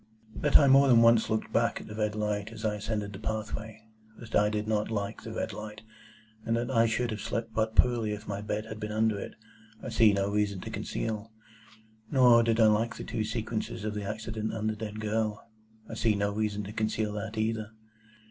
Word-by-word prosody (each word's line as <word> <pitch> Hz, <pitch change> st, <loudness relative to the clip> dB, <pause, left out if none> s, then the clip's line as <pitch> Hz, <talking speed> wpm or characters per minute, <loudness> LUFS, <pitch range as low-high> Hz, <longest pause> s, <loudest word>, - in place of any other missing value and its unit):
That 145 Hz, -, +5 dB
I 145 Hz, -, +5 dB
more 135 Hz, +1 st, +6 dB
than 115 Hz, -3 st, +6 dB
once 115 Hz, -1 st, +5 dB
looked 110 Hz, 0 st, -2 dB
back -, -, +2 dB
at -, -, -10 dB
the -, -, -9 dB
red 105 Hz, -1 st, -1 dB
light 105 Hz, 0 st, -2 dB
as 110 Hz, -1 st, -7 dB
I 105 Hz, -, +1 dB
ascended 105 Hz, -1 st, -3 dB
the 95 Hz, -, -8 dB
pathway, 110 Hz, 0 st, -5 dB, 0.3 s
that 115 Hz, -2 st, -11 dB
I 105 Hz, 0 st, +4 dB
did 105 Hz, 0 st, -2 dB
not 105 Hz, -1 st, 0 dB
like 105 Hz, -3 st, -3 dB
the -, -, -7 dB
red -, -, -3 dB
light, 105 Hz, 0 st, -8 dB, 0.6 s
and 115 Hz, +1 st, 0 dB
that 120 Hz, +2 st, -2 dB
I 115 Hz, -2 st, +4 dB
should 115 Hz, +1 st, 0 dB
have 105 Hz, -2 st, -4 dB
slept 115 Hz, 0 st, -3 dB
but 110 Hz, 0 st, 0 dB
poorly 120 Hz, -3 st, +3 dB
if 105 Hz, +1 st, -6 dB
my 100 Hz, -1 st, -3 dB
bed 105 Hz, +1 st, -3 dB
had 110 Hz, -1 st, -8 dB
been 105 Hz, 0 st, -4 dB
under 110 Hz, -1 st, +1 dB
it, -, -, -7 dB, 0.4 s
I -, -, -6 dB
see 115 Hz, -2 st, +5 dB
no 100 Hz, 0 st, 0 dB
reason 105 Hz, -2 st, 0 dB
to -, -, -7 dB
conceal. 110 Hz, 0 st, -4 dB, 0.8 s
Nor 125 Hz, -4 st, +6 dB
did 115 Hz, 0 st, +1 dB
I 110 Hz, -, +7 dB
like 110 Hz, +2 st, +2 dB
the -, -, -7 dB
two 110 Hz, -, -2 dB
sequences 110 Hz, 0 st, -3 dB
of 110 Hz, -, -2 dB
the 105 Hz, -1 st, -4 dB
accident 110 Hz, +1 st, -4 dB
and 110 Hz, 0 st, -2 dB
the 110 Hz, -, 0 dB
dead 105 Hz, 0 st, -6 dB
girl. 110 Hz, 0 st, -2 dB, 0.4 s
I -, -, -8 dB
see 110 Hz, -2 st, +1 dB
no 100 Hz, 0 st, 0 dB
reason 105 Hz, -1 st, -1 dB
to 100 Hz, +2 st, -7 dB
conceal 110 Hz, -1 st, -1 dB
that 110 Hz, +1 st, -5 dB
either. 110 Hz, 0 st, -1 dB
110 Hz, 220 wpm, -29 LUFS, 105-115 Hz, 0.8 s, I